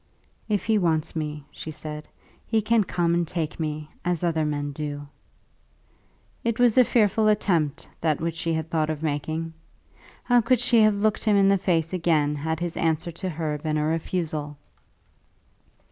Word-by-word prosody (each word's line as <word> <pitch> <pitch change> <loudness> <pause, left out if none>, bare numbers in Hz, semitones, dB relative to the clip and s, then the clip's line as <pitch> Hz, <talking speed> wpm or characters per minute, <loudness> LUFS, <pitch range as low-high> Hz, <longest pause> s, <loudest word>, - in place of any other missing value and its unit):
"If 205 -2 0
he 220 -1 +3
wants 160 -4 0
me," 150 -2 -4
she - - -8
said, 150 0 -7 0.4
"he 225 - +2
can 220 +1 +3
come 170 -1 0
and 170 -1 +1
take 160 -2 -3
me, 155 -1 -4
as 180 -1 -1
other 160 -2 +1
men 145 -1 -2
do." 145 0 -5 1.4
It 230 -1 0
was 245 -3 +4
a 255 - +7
fearful 220 -2 +2
attempt, 175 -8 +1
that 155 -3 +1
which 165 0 -2
she 165 0 -2
had 160 0 -3
thought 155 -1 +1
of 155 0 -3
making. 160 +2 -2 0.7
How 245 -1 +4
could 235 +2 +2
she 240 -1 +4
have 215 -1 +5
looked 210 +1 0
him 210 -2 +4
in 195 0 +5
the 195 - +4
face 165 -2 0
again 160 -5 +2
had 160 +2 -2
his 175 -1 -3
answer 165 +1 0
to 185 +3 -5
her 155 -3 -3
been 155 0 -1
a 150 - 0
refusal? 155 -2 -2
165 Hz, 175 wpm, -25 LUFS, 155-195 Hz, 1.4 s, a